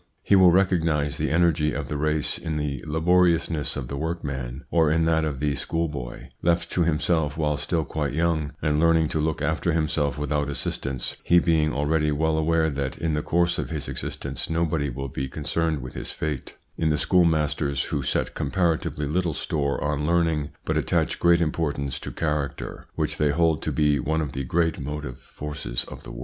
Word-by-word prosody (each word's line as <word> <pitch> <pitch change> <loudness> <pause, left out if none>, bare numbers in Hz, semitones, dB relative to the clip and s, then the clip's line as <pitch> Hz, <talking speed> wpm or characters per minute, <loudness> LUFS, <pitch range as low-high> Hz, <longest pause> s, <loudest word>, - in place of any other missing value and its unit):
He 100 - +4
will 95 -2 +7
recognise 80 -6 +2
the 75 -1 0
energy 80 -2 +2
of 70 -2 -3
the 75 - -3
race 75 0 0
in 80 -2 -3
the 70 -4 -3
laboriousness 85 -1 +2
of 70 -4 -4
the 70 - -5
workman, 70 -5 -4
or 80 -3 +4
in 80 +1 +2
that 80 -1 +2
of 75 -4 -2
the 75 0 +1
schoolboy, 70 -5 -3
left 85 0 +1
to 90 - +1
himself 80 -2 +1
while 75 -2 +1
still 75 +2 -1
quite 75 -3 -2
young, 80 -2 0
and 75 -1 +2
learning 80 -1 +4
to 80 - -1
look 75 -1 -1
after 80 +3 0
himself 75 -4 0
without 75 0 -1
assistance, 70 -2 -2
he 85 - +4
being 80 -3 +3
already 75 +1 +1
well 80 +2 +1
aware 80 0 +2
that 70 -1 -3
in 80 -1 -1
the 75 - 0
course 85 +2 +1
of - - -3
his 75 -5 -3
existence - - -4
nobody 80 -3 0
will 70 +2 -4
be 65 +1 -4
concerned 75 +1 -1
with 65 - -7
his - - -5
fate; 75 -4 -4 0.2
in 80 - +2
the 75 - +2
schoolmasters, 75 -5 +2
who 70 - -2
set 65 - -1
compara 85 +2 +1
tively 75 -1 -3
little 85 +1 0
store 70 -2 -1
on 75 0 -1
learning 80 -4 +1 0.2
but - - 0
attach - - 0
great 85 0 +4
import 80 -2 0
ance 70 -1 -3
to - - -6
character, 75 -3 -3
which - - -1
they 75 - +3
hold 80 +1 +2
to - - -2
be 75 -2 +2
one 80 +5 0
of 75 -4 -2
the 70 0 -3
great 80 +4 0
motive 75 -2 -5
forces 65 -4 -4
of - - -10
the - - -11
world. - - -8
75 Hz, 195 wpm, -25 LUFS, 70-80 Hz, 0.2 s, will